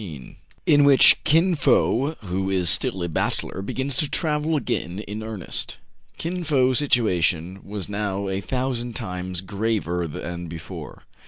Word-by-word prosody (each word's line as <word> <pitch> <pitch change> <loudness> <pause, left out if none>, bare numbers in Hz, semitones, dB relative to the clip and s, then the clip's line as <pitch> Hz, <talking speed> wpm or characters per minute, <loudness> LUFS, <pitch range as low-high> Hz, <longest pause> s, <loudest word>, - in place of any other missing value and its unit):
^ 75 - -9 0.3
IN 145 -1 +5
WHICH 140 -2 +7
KIN 165 +4 +4
FO, 140 0 +2
WHO 95 -1 -2
IS 90 -3 +2
STILL 90 -1 +1
A - - -1
BACHELOR, 85 +3 -2
BEGINS 130 +6 -2
TO 150 - +2
TRAVEL 155 -1 0
AGAIN 90 - -2
IN 105 +1 -6
EARNEST. 110 -4 -3 0.4
KiN 175 +2 -3
Fo's 130 -5 +3
situation 95 - +1
was 100 -2 -5
now 100 -1 -2
a 95 0 -2
thousand 125 -1 -2
times 90 0 -4
graver 95 -3 -1
than 85 +3 -6
before. 80 0 -9
105 Hz, 145 wpm, -23 LUFS, 90-135 Hz, 0.4 s, WHICH